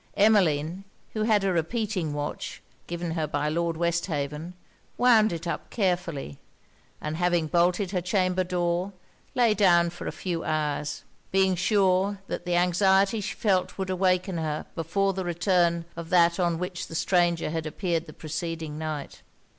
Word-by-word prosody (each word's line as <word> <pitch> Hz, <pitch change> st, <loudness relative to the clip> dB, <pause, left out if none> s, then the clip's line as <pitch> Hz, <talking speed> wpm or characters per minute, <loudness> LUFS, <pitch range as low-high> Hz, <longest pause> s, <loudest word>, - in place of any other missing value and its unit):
Emmeline, 185 Hz, -5 st, +3 dB, 0.3 s
who 215 Hz, -, -2 dB
had 215 Hz, -3 st, +3 dB
a 195 Hz, -1 st, +1 dB
repeating 185 Hz, -1 st, -1 dB
watch, 145 Hz, 0 st, -4 dB, 0.3 s
given 170 Hz, 0 st, -3 dB
her 160 Hz, -2 st, -1 dB
by 145 Hz, 0 st, -1 dB
Lord 165 Hz, +1 st, -1 dB
Westhaven, 165 Hz, -1 st, -2 dB, 0.4 s
wound 225 Hz, -4 st, +5 dB
it 170 Hz, 0 st, -5 dB
up 170 Hz, -, -4 dB
carefully; 175 Hz, -, -2 dB, 0.6 s
and 155 Hz, +1 st, -4 dB
having 175 Hz, -2 st, +2 dB
bolted 175 Hz, +4 st, +1 dB
her 185 Hz, -3 st, 0 dB
chamber 185 Hz, 0 st, +1 dB
door, 180 Hz, +1 st, -1 dB, 0.4 s
lay 235 Hz, -3 st, +4 dB
down 175 Hz, -5 st, +4 dB
for 175 Hz, -, -7 dB
a -, -, -1 dB
few 175 Hz, -3 st, -3 dB
hours; 150 Hz, -1 st, -2 dB, 0.3 s
being 190 Hz, 0 st, +3 dB
sure 190 Hz, +1 st, +2 dB
that 185 Hz, -, -5 dB
the 175 Hz, 0 st, 0 dB
anxiety 190 Hz, +4 st, +3 dB
she 200 Hz, -, -4 dB
felt 190 Hz, -4 st, 0 dB
would 190 Hz, -1 st, -2 dB
awaken 185 Hz, -1 st, +1 dB
her 155 Hz, -1 st, -2 dB
before 195 Hz, +5 st, 0 dB
the 190 Hz, 0 st, -3 dB
return 175 Hz, -1 st, +1 dB
of 170 Hz, -1 st, -7 dB
that 170 Hz, 0 st, +4 dB
on 170 Hz, -2 st, +1 dB
which 180 Hz, +1 st, -4 dB
the 165 Hz, -, -8 dB
stranger 175 Hz, -2 st, +2 dB
had 160 Hz, -1 st, -3 dB
appeared 170 Hz, 0 st, -2 dB
the -, -, -9 dB
preceding 160 Hz, -1 st, -5 dB
night. 155 Hz, -3 st, -5 dB
175 Hz, 155 wpm, -26 LUFS, 165-190 Hz, 0.6 s, wound